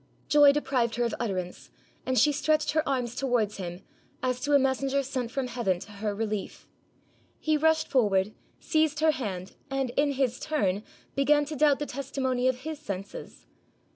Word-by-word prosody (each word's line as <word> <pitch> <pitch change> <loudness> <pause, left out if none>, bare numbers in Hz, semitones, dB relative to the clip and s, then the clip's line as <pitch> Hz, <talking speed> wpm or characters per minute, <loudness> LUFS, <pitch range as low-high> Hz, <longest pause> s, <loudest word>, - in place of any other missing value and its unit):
Joy 290 -1 +7
deprived 260 -5 0
her 240 - 0
of 235 - -1
utterance, 185 -6 -4 0.4
and 260 0 +1
she 300 - +5
stretched 305 +2 +1
her 315 - +2
arms 250 -3 -1
towards 245 -6 0
him, 180 0 -6 0.4
as 255 -1 0
to 290 +2 -1
a - - +8
messenger 270 +1 +1
sent 255 -3 -3
from 265 +2 -2
Heaven 235 -7 0
to 200 +3 -11
her 205 0 -3
relief. 215 -1 -4 0.7
He 310 -1 +1
rushed 315 +1 +3
forward, 210 -5 +2 0.3
seized 310 -1 +1
her 315 0 +5
hand, 200 -11 -5 0.2
and 270 -2 -1
in 285 +3 +1
his 260 -3 0
turn, 205 -11 0 0.3
began 290 +1 +3
to 305 +1 -5
doubt 290 -1 +4
the 295 - -3
testimony 260 -2 -1
of 255 -1 0
his 315 0 -5
senses. 200 -8 -7
260 Hz, 170 wpm, -28 LUFS, 220-290 Hz, 0.7 s, a